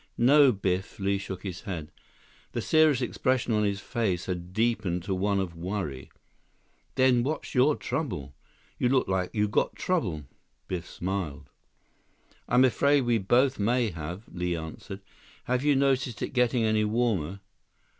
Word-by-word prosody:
"No, 140 +2 +6
Biff," 95 -2 -2
Li 100 -1 0
shook 95 -1 -7
his 95 -3 -5
head. 85 -8 -6 0.6
The - - -1
serious 155 -5 +4
expression 125 0 0
on 105 0 +2
his 100 -1 0
face 100 -8 -2
had 90 -1 -4
deepened 105 -5 0
to 95 - -2
one 100 +1 +1
of 90 -3 -3
worry. 85 -6 -4 0.9
"Then 130 -2 +4
what's 150 +6 -3
your 140 +3 +4
trouble? 90 - -4 0.5
You 125 - +2
look 130 0 +2
like 95 -1 0
you 105 -1 +2
got 105 - 0
trouble." 90 - -1 0.4
Biff 90 -1 -4
smiled. 90 -5 -4 1.0
"I'm 125 +2 +5
afraid 140 +3 +3
we 120 -2 +1
both 125 +7 +2
may 115 +1 +1
have," 85 +5 -6
Li 90 -1 -1
answered. 80 +4 -7 0.4
"Have 125 +1 0
you 145 -1 +4
noticed 135 -3 +1
it - - -4
getting 125 -1 +2
any 110 -1 +2
warmer?" 105 -5 0
105 Hz, 150 wpm, -27 LUFS, 90-125 Hz, 1.0 s, No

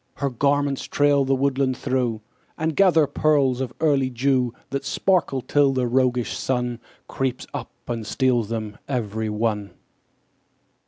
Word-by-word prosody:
Her 140 -1 -2
garments 140 +2 +1
trail 145 -1 +2
the 135 0 +2
woodland 135 -1 0
through, 125 -5 -1 0.4
And 160 0 -1
gather 175 -6 +5
pearls 140 -3 +2
of 130 -3 -3
early 140 -4 +2
dew 125 0 +1 0.2
That 140 0 -2
sparkle 170 -8 +1
till 140 +1 +2
the 130 -1 0
roguish 125 -1 +1
Sun 125 -2 -2 0.3
Creeps 130 -2 -2
up - - -5 0.2
and 115 -2 -3
steals 120 -1 +1
them 110 -2 -4
every 110 -4 -2
one. 105 -1 -1
130 Hz, 140 wpm, -23 LUFS, 120-140 Hz, 0.4 s, gather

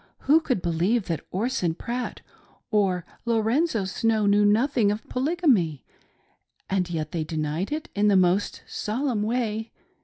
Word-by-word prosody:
Who 300 +4 +5
could 255 - -2
believe 180 +7 +1
that 165 -4 -3
Orson 190 -5 -1
Pratt 240 +6 -4 0.5
or 190 -5 +1 0.2
Lorenzo 230 - +1
Snow 220 +2 +1
knew 205 +1 +4
nothing 220 +1 +3
of 210 +2 -5
Polygamy? 255 - +1 0.8
And 185 -2 0
yet 155 -3 -3
they 165 -2 -2
denied 155 - -3
it 310 +2 -3
in 205 +1 +2
the 205 - +4
most 185 +2 +1
solemn 235 +1 -2
way. 220 0 -1
210 Hz, 140 wpm, -25 LUFS, 180-245 Hz, 0.8 s, Who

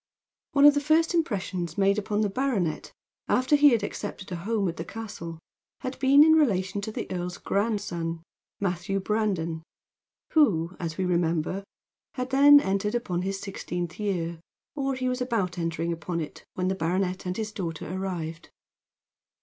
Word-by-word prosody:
One 280 0 +6
of 290 - +9
the 290 - 0
first 315 +3 +3
impressions 190 - -1
made 200 +1 +3
upon 210 0 -1
the 210 - +1
baronet, 205 - -1 0.4
after 255 +4 +3
he 290 0 +7
had 230 -5 +2
accepted 200 -1 -5
a - - -2
home 200 +3 -1
at 165 - -4
the 165 - -3
castle, 190 -6 -7 0.4
had 260 -1 -5
been 275 +2 +7
in 315 0 +6
relation 200 -10 +2
to 220 - -4
the - - -4
earl's 180 -1 -3
grandson 180 -6 -2 0.4
Matthew 195 +1 -1
Brandon 190 -6 -1 0.7
who, 185 - +3
as 165 -3 -4
we 190 - 0
remember, 170 +1 0 0.5
had 255 0 -3
then 285 +2 +8
entered 200 -1 -1
upon 185 -8 -1
his 195 +1 -2
sixteenth 175 -3 -5
year; 170 -5 -2 0.4
or 275 -2 -1
he 255 0 -2
was 250 0 -1
about 210 -8 -1
entering 165 0 -1
upon 170 +1 -4
it 155 - -7
when 185 0 -1
the 190 - +1
baronet 185 +1 -1
and 180 - -2
his 215 -1 -3
daughter 170 -6 -5
arrived. 170 -4 -4
195 Hz, 165 wpm, -27 LUFS, 175-235 Hz, 0.7 s, of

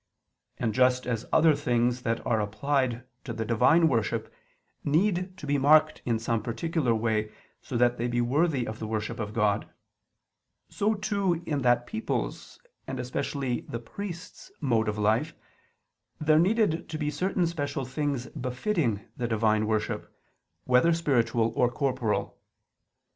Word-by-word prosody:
And 115 -3 -1
just 125 +1 +3
as 115 -2 -2
other 160 0 +5
things 125 -3 +1
that 115 -1 -2
are 110 -2 +1
applied 120 +3 -1 0.2
to 120 - -5
the 110 0 -3
divine 160 +9 +4
worship, 115 -7 -1 0.5
need 185 +4 +1
to - - -8
be 145 0 +1
marked 155 +2 +5
in 115 -2 +1
some 115 0 -1
particular 125 +2 0
way 110 -1 0 0.3
so 125 - -4
that 120 0 +2
they 120 - 0
be 120 0 -1
worthy 135 +2 +1
of 110 +1 -6
the 110 - -4
worship 110 +2 -3
of 105 -2 -3
God; 105 -2 +1 1.0
so 215 +2 0
too 200 -5 -1
in 145 -4 -1
that 120 -1 +3
people's, 220 - -4 0.3
and 130 - -4
especially 125 0 -2
the 115 - -3
priests', 175 - -8
mode 115 -6 +1
of 105 - -3
life, 105 +1 +1 0.8
there 155 0 +4
needed 190 -2 +2
to 155 - -4
be 150 -1 -1
certain 185 +1 0
special 145 -5 -2
things 140 -1 -2
befitting 125 - -1 0.2
the 120 - -1
divine 110 -1 +2
worship, 110 -1 -2 0.5
whether 130 +7 +4
spiritual 115 -8 +1
or 125 - +3
corporal. 125 -3 -1
125 Hz, 150 wpm, -28 LUFS, 115-155 Hz, 1.0 s, other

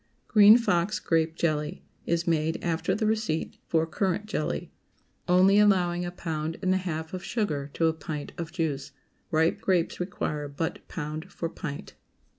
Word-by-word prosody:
GREEN 210 +1 +8
FOX 205 -4 +1
GRAPE 160 -1 +1
JELLY 150 -3 -1 0.2
✠ - - -2
Is 170 0 +1
made 160 -1 +1
after 170 +2 0
the 215 +1 -1
receipt 215 -7 -1
for 160 -1 +2
currant 190 +4 -1
jelly, 150 - -3 0.6
only 185 +3 +5
allowing 180 -4 +3
a 175 - -4
pound 160 -2 -4
and 185 0 +3
a - - +3
half 160 -3 -4
of 185 0 -5
sugar 150 - -2
to 165 - +2
a 160 - +3
pint 150 -2 -6
of 170 -1 -5
juice. 150 -6 -2 0.4
Ripe 160 +1 +2
grapes 180 -3 +1
require 150 -5 -3
but 145 +3 -3
pound 155 +3 -5
for 165 - -3
pint. 150 -4 -7
165 Hz, 165 wpm, -27 LUFS, 155-185 Hz, 0.6 s, GREEN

